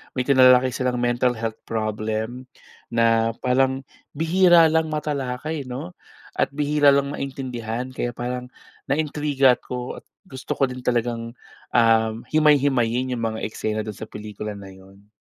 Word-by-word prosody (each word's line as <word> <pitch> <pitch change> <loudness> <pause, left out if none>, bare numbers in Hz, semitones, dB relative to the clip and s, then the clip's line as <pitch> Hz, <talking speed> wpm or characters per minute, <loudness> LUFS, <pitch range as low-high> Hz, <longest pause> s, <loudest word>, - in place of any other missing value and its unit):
may 125 - 0
tinalakay 130 -1 +5
silang 125 0 -1
mental 120 0 +1
health 110 0 -4
problem 110 +3 -3 0.4
na 115 -1 +2
parang 130 +1 +1 0.3
bihira 165 +1 +5
lang 160 0 +2
matalakay 150 -1 -3
'no, 125 -8 -6 0.4
at - - 0
bihira 145 -1 +4
lang 140 0 0
maintindihan 130 -3 -5
kaya 120 -2 -4
parang 125 +1 -4 0.4
naintriga 140 -3 +2
'ko 125 0 -6
at - - -29 0.2
gusto 130 -1 -5
ko - - 0
din 125 - -7
talagang, 120 -1 -1 0.4
um, 115 -1 +3
himay-himayin 130 -5 +2
yung 115 - -4
mga 110 - -6
eksena 110 0 -3
do'n 105 -2 -7
sa - - -6
pelikula 105 0 -7
na 100 -1 -10
'yon. 95 +2 -17
125 Hz, 140 wpm, -23 LUFS, 115-140 Hz, 0.4 s, tinalakay